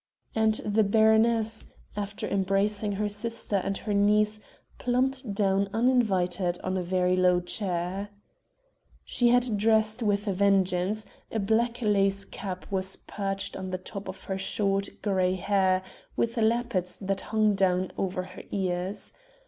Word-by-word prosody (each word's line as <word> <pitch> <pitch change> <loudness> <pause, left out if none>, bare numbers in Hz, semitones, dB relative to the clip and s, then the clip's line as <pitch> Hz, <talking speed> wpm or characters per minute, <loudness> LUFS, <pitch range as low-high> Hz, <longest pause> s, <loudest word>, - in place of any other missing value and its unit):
And 220 -1 +2
the 210 +1 +3
baroness, 220 +1 +3 0.3
after 205 0 -4
embracing 200 +2 0
her 210 +1 -1
sister 210 0 -2
and 195 +1 -2
her 210 - -3
niece, 210 +1 +3 0.4
plumped 255 -3 0
down 195 -1 +1
uninvited 190 -7 +2
on 185 0 -1
a 185 - 0
very 180 0 +1
low 180 -1 +4
chair. 185 +1 -2 1.0
She 245 - +2
had 245 -3 +3
dressed 220 +1 +2
with 205 -1 0
a 200 - +1
vengeance: 195 +1 +2 0.3
a - - -2
black 230 +3 0
lace 200 -1 +2
cap 185 -2 -6
was 190 -1 -1
perched 195 -1 -3
on 190 -1 -5
the 185 - -2
top 195 +2 -7
of 190 - -8
her 190 0 -3
short, 195 0 +1
grey 185 -3 +1
hair, 190 -1 +1 0.3
with 230 0 0
lappets 225 -5 0
that 195 -1 -2
hung 215 -1 +3
down 185 -1 +1
over 185 -1 -2
her 185 0 -10
ears. 185 0 -2
200 Hz, 140 wpm, -27 LUFS, 190-220 Hz, 1.0 s, low